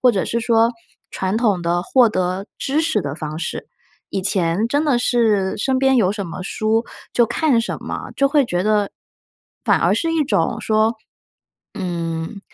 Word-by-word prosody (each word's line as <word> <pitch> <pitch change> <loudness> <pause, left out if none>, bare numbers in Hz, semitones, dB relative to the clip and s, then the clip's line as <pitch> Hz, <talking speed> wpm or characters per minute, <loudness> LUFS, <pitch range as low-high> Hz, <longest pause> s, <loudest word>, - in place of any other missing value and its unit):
或 250 - +6
者 195 -4 -1
是 235 - -1
说 230 0 +3 0.4
传 190 +3 -2
统 210 -6 +2
的 170 +1 0
获 245 +3 +4
得 185 0 -2
知 285 +3 0
识 325 0 0
的 145 0 -4
方 155 -1 -5
式。 170 - -4 0.4
以 195 - -3
前 190 +2 +1
真 290 +4 +1
的 265 -5 +2
是 215 -6 +2
身 260 +3 +1
边 265 -1 +4
有 200 -4 +3
什 200 -2 -4
么 185 - -7
书 220 +4 0 0.3
就 240 -1 +3
看 275 -5 +2
什 - - -3
么， - - -6
就 275 0 +3
会 285 -1 +3
觉 180 -6 -1
得 210 -1 +2 0.8
反 - - +3
而 - - +3
是 330 -1 0
一 315 - +2
种 280 - 0
说， 220 +1 +2 0.8
嗯， 170 -1 -4
215 Hz, 190 characters per minute, -20 LUFS, 185-245 Hz, 0.8 s, 或